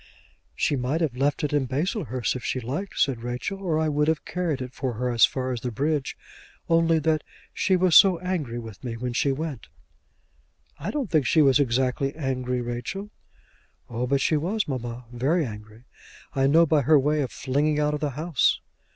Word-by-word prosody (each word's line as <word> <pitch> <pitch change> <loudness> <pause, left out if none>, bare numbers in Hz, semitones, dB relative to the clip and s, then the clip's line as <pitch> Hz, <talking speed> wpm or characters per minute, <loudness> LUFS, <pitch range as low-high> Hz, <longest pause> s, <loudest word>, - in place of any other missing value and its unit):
"She 145 - +1
might 130 +5 -1
have 150 -7 0
left 140 +4 0
it 150 - -1
in 140 -3 +1
Baslehurst 130 - -1
if 125 - -6
she 130 - -1
liked," 140 - -5
said 130 -4 +1
Rachel, 125 +11 -4
"or 170 -5 0
I 160 0 +1
would 150 0 +1
have 160 -1 0
carried 175 -6 -2
it 130 0 -6
for 130 -2 -3
her 125 +2 -2
as 120 -1 +6
far 130 -1 -3
as 120 -3 -3
the 125 - -2
bridge, 140 +4 -1 0.5
only 165 0 +3
that 155 0 +1 0.3
she 190 - +2
was 180 -2 +3
so 190 -3 +8
angry 165 -9 -3
with 115 -2 -9
me 115 -2 -4
when 125 +1 -3
she 140 +3 +1
went." 145 -2 -4 1.1
"I - - -4
don't 275 - -3
think 150 -6 +2
she 155 - +5
was 135 -2 +5
exactly 130 +1 0
angry, 130 -4 -2
Rachel." 120 - -5 0.8
"Oh, 120 +2 -2
but 140 +1 +1
she 155 - +2
was, 195 +7 -1
mamma; 120 -3 -5
very 145 +7 +1
angry. 105 0 -10 0.5
I 135 0 +2
know 165 +4 +5
by 155 -2 +3
her 150 +3 +5
way 150 +2 +2
of 130 - -3
flinging 145 +3 0
out 150 0 +1
of 150 - -2
the 150 - -1
house." 160 -3 +2
140 Hz, 195 wpm, -25 LUFS, 125-160 Hz, 1.1 s, so